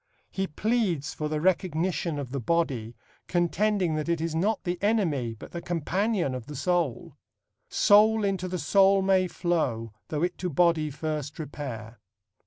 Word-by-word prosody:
He 195 0 -2
pleads 190 - 0
for 150 -1 -3
the 155 0 -1
recognition 175 -2 0
of 135 -3 -5
the 140 - -2
body, 125 -5 -1 0.3
contending 180 +1 +1
that 155 +1 -2
it 170 -1 +1
is 165 0 -2
not 195 +7 0
the 175 -1 -2
enemy 165 - +1
but - - -11
the 170 - -5
companion 175 - -1
of 125 -1 -6
the 150 - -7
soul: 160 -1 -1 0.5
Soul 215 +1 +5
into 195 -2 -1
the 180 0 -3
soul 195 +1 +4
may 190 -1 +3
flow 130 - -1
Though 155 +1 -2
it 180 0 -1
to 180 - -2
body 165 -1 +2
first 150 0 -4
repair. 130 -7 -7
170 Hz, 160 wpm, -27 LUFS, 145-190 Hz, 0.5 s, Soul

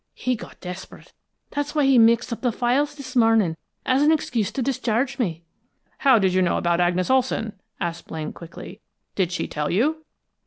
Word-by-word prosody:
he 250 0 -1
got - - -11
desperate. 180 +1 -9 0.4
That's 290 +1 -3
why 295 -2 +3
he 270 -2 +5
mixed 230 +1 +4
up - - -7
the 245 - +1
files 270 +6 0
this 270 -3 -9
morning, 225 -7 +4 0.3
for - - +1
an 290 +4 +4
excuse 240 -9 0
to 265 - -1
discharge 260 +1 -1
me." 170 -8 -2 0.6
"How 265 -4 +5
did 190 -3 +2
you 185 - +3
know 180 - +2
about 170 0 +1
Agnes 180 +4 +1
Olson?" 250 -4 +1 0.3
asked 170 -1 -4
Blaine 155 -1 -5
quickly. 170 0 -11 0.3
"Did 185 -3 0
she 175 - -2
tell 150 0 -3
you?" 305 - +1
230 Hz, 185 wpm, -23 LUFS, 180-265 Hz, 0.6 s, he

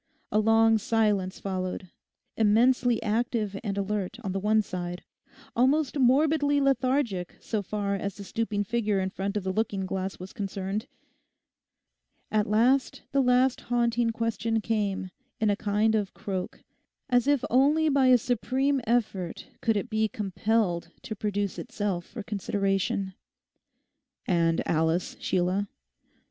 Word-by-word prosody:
A 210 - +3
long 225 +1 +4
silence 205 -4 +1
followed, 185 -1 -4 0.4
immensely 235 +2 +3
active 220 -1 -1
and 200 -3 -3
alert 200 0 -2
on 195 - -2
the 195 - -1
one 215 +2 +2
side, 180 -2 -5 0.5
almost 270 +4 +2
morbidly 285 +3 +3
lethargic 255 -8 0
so 215 -2 -2
far 200 0 -2
as 200 0 -3
the 200 - -8
stooping 210 0 -2
figure 210 -2 0
in 190 0 -2
front 200 +2 -3
of 205 - -2
the 190 0 -2
looking 200 -2 -1
glass 190 0 -3
was 185 +1 -9
concerned. 200 +2 -4 1.4
At 215 -1 +2
last 245 +5 +2
the 275 - +3
last 250 0 +3
haunting 235 -1 +1
question 230 0 -1
came 205 -4 -1 0.3
in 215 -2 +2
a - - +2
kind 210 +2 +1
of 210 -3 -1
croak, 190 -2 -5 0.4
as 245 -1 +2
if 285 -3 +2
only 290 +6 +4
by 275 -3 +3
a 255 -1 +7
supreme 260 +4 0
effort 205 -7 -1
could 225 -2 +2
it 200 - -2
be 220 0 +1
compelled 200 -3 -1
to 220 - -5
produce 205 -1 -2
itself 205 -9 -3
for 225 - -7
consideration. 195 -1 -1 1.1
'And 165 -2 +1
Alice, 160 +2 +1
Sheila? 185 +3 0
215 Hz, 135 wpm, -27 LUFS, 195-240 Hz, 1.4 s, a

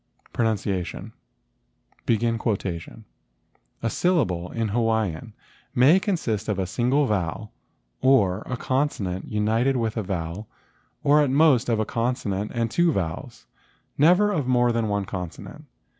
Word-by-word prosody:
PRONUNCIATION 100 -6 -2 0.9
"A 105 - -4
syllable 110 - 0
in 115 -2 -2
Hawaiian 110 -3 -1 0.4
may 145 +9 +6
consist 160 - -2
of 105 - 0
a 95 - -1
single 125 +9 +1
vowel, 105 -1 -2 0.5
or 105 -8 +3
a 125 - -3
consonant 120 -10 -2
united 110 +5 +1
with 115 -1 -2
a - - +1
vowel 95 +1 -4 0.6
or 150 +1 +5
at 145 - +2
most 135 -3 +4
of 115 -2 +1
a 110 - +1
consonant 110 -4 -2
and 115 -1 -1
two 175 +4 +3
vowels, 80 - -4 0.5
never 180 +8 +4
of 150 -10 -1
more 120 -1 +3
than 115 -1 0
one 100 -1 -1
consonant. 90 -3 -7
115 Hz, 125 wpm, -24 LUFS, 95-130 Hz, 0.9 s, may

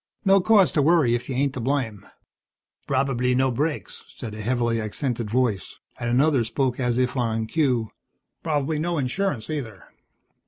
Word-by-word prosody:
"No 195 0 +5
cause 200 -2 +5
to 150 - +2
worry 150 -5 +4
if 120 +2 -2
you 130 - -2
ain't 140 +1 +1
to - - -5
blame." 115 -6 -2 0.8
"Probably 130 -2 +1
no 130 0 +2
brakes," 145 +5 -3
said 115 -5 -8
a 105 - -6
heavily 115 0 0
accented 115 +1 -3
voice, 115 -6 -1 0.2
and 120 - -2
another 135 +1 +3
spoke 125 +2 -1
as 125 -2 0
if 130 +1 0
on 115 -3 0
cue, 125 -5 0 0.5
"Probably 150 -1 -1
no 170 +1 -1
insurance, 140 - -1
neither." 125 -11 -5
130 Hz, 160 wpm, -24 LUFS, 115-145 Hz, 0.8 s, No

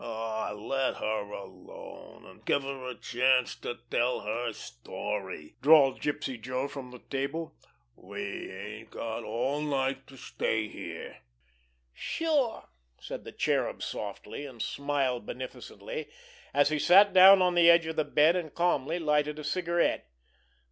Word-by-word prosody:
"Aw, 110 -1 -3
let 130 +6 -1
her 105 -1 -2
alone, 100 - -11
an' - - -15
give 140 - +1
her 135 -2 -5
a 125 - -6
chance 125 +1 +2
to 120 - -5
tell 125 +1 +1
her 115 +3 -2
story," 95 - -6
drawled 140 -2 +6
Gypsy 135 -5 -2
Joe 130 +3 -2
from 135 -3 -8
the 125 - -10
table. 140 +4 -2 0.4
"We - - -6
ain't 105 +3 -8
got 115 -1 -5
all 125 +7 -1
night 135 -2 -1
to 135 - -14
stay 110 -3 -1
here." - - -8 0.8
"Sure!" 290 - -1 0.3
said - - -7
the - - -7
Cherub - - 0
softly, - - -5
and 125 -4 -12
smiled 135 -4 -1
beneficently, 460 - -7 0.4
as 145 0 +4
he 155 -1 0
sat 195 +5 +7
down 190 0 +9
on 180 -1 +3
the 170 -1 +6
edge 170 -1 +6
of 160 0 -4
the 155 - +2
bed 150 +3 +4
and 165 -5 -3
calmly 170 -2 +1
lighted 150 -2 +1
a 155 - -6
cigarette. 170 - 0
135 Hz, 145 wpm, -29 LUFS, 115-160 Hz, 0.8 s, down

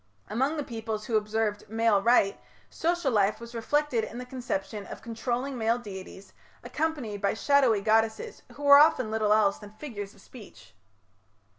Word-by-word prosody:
Among 265 +8 0
the 295 - -2
peoples 225 -3 -5
who 230 - -2
observed 215 -1 -1
"male 225 -2 +2
right", 230 -3 +3 0.3
social 340 -4 0
life 205 -2 +2
was 235 +1 -10
reflected 250 +1 0
in 230 - -7
the 250 - -6
conception 220 -5 -5
of - - -9
controlling 245 +3 -3
male 225 +1 +2
deities, 195 -3 -10 0.3
accompanied 275 -11 -3
by 200 - +1
shadowy 255 -3 +3
goddesses 225 - 0
who 290 - -10
were 285 0 +9
often 255 -7 +4
little 215 -1 +1
else 210 -2 +3
than 210 -1 -12
figures 215 -5 -8
of 200 - -19
speech. 210 - -15
225 Hz, 160 wpm, -27 LUFS, 210-260 Hz, 0.3 s, were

